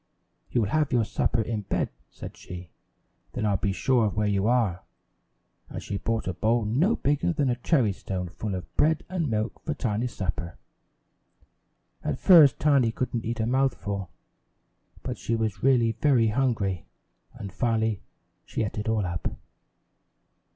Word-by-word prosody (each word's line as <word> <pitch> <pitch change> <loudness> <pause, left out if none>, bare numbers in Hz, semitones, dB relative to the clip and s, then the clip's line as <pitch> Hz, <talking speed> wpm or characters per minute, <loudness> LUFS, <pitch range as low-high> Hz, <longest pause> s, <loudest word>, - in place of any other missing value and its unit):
"You 120 - +1
will 100 - 0
have 155 +2 +1
your 120 -3 +3
supper 110 - 0
in 110 -1 -3
bed," 100 - -1 0.2
said - - -9
she, 90 -1 -9 0.6
"then 110 - -2
I'll 100 -2 +2
be 100 - 0
sure 120 +3 +2
of 100 - -4
where 105 0 +1
you 100 0 +1
are!" 115 -8 +2 0.9
And - - -5
she 100 - -3
brought 115 -3 -2
a 95 - -1
bowl 110 +5 +1
no 155 - +2
bigger 135 -12 0
than 140 -4 +1
a - - 0
cherry 120 - +2
stone 90 -1 -4
full 95 +3 -4
of 90 - -8
bread 155 0 +2
and 175 -5 -1
milk 110 -1 -2
for 155 -2 -2
Tiny's 120 -2 -2
supper. 90 -2 -4 1.5
At - - -1
first 155 -9 +7
Tiny 140 -6 +3
couldn't 120 -1 -3
eat 115 +1 -3
a 110 - +1
mouthful, 115 -7 -1 0.9
but - - -4
she 115 - -1
was 110 -4 -2
really 125 -4 +4
very 120 -3 +3
hungry, 105 -7 0 0.5
and 100 -2 -8
finally 110 -3 0 0.4
she - - -3
ate 105 0 -3
it 105 - -2
all 110 -3 +1
up. 85 -1 -2
110 Hz, 165 wpm, -26 LUFS, 100-125 Hz, 1.5 s, first